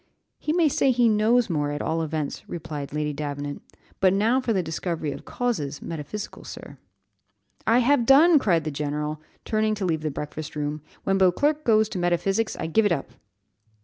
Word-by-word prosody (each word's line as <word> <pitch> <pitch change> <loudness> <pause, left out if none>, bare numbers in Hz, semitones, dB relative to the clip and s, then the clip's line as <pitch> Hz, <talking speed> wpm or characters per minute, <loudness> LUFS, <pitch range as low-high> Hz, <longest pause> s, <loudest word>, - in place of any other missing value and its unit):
"He 300 - -2
may 335 -1 +3
say 275 -1 +2
he 245 -2 +4
knows 225 +2 +3
more, 150 -5 -1
at 145 0 -3
all 165 +1 -1
events," 155 -2 -4
replied 150 -4 -6
Lady 150 0 -2
Davenant; 145 0 -5 0.4
"but 190 -1 +4
now 225 +6 +2
for 245 - -1
the 190 -4 +1
discovery 160 -1 -3
of 140 - -8
causes, 155 - -2
metaphysical 165 +6 -6
sir." - - -10 0.9
"I 230 - +5
have 265 -4 +3
done," 305 +4 +7
cried 170 - +2
the 155 - -3
general, 150 +1 -3 0.2
turning 215 0 +1
to 200 -2 -3
leave 160 -3 0
the 155 - -1
breakfast 150 +2 -6
room; 150 0 -3 0.2
"when 195 0 +1
Beauclerc 285 - +2
goes 220 -3 +4
to 190 - -4
metaphysics 185 +5 0
I - - -4
give 205 +7 +3
it - - -2
up." 140 -7 -2
175 Hz, 180 wpm, -25 LUFS, 150-225 Hz, 0.9 s, done